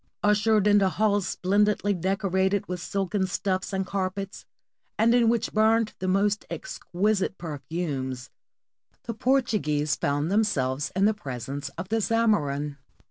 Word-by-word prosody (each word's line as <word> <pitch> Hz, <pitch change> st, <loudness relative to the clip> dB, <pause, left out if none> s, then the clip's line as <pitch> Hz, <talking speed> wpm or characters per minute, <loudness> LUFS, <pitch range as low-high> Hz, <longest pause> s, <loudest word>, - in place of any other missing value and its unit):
Ushered 210 Hz, 0 st, +3 dB
into 205 Hz, -2 st, +5 dB
halls 205 Hz, -1 st, +1 dB
splendidly 205 Hz, +2 st, +1 dB
decorated 190 Hz, +1 st, 0 dB
with 180 Hz, 0 st, -4 dB
silken 195 Hz, +1 st, -1 dB
stuffs 185 Hz, +1 st, -2 dB
and 190 Hz, -1 st, -1 dB
carpets, 195 Hz, 0 st, -4 dB, 0.5 s
and 230 Hz, +2 st, +4 dB
in 240 Hz, -2 st, +4 dB
which 230 Hz, -1 st, 0 dB
burned 220 Hz, 0 st, +3 dB
the 185 Hz, -, -3 dB
most 200 Hz, +2 st, +1 dB
exquisite 200 Hz, -, -2 dB
perfumes, 145 Hz, -5 st, -4 dB, 0.7 s
the 230 Hz, -, -4 dB
Portuguese 215 Hz, -, +1 dB
found 145 Hz, +4 st, -1 dB
them 215 Hz, +2 st, +4 dB
selves 135 Hz, -7 st, -1 dB
in 195 Hz, +1 st, +3 dB
the 215 Hz, -, +4 dB
presence 135 Hz, -, -6 dB
of 180 Hz, +3 st, -5 dB
the 225 Hz, +1 st, +1 dB
Zamorin. 150 Hz, -12 st, +1 dB
195 Hz, 135 wpm, -26 LUFS, 165-210 Hz, 0.7 s, into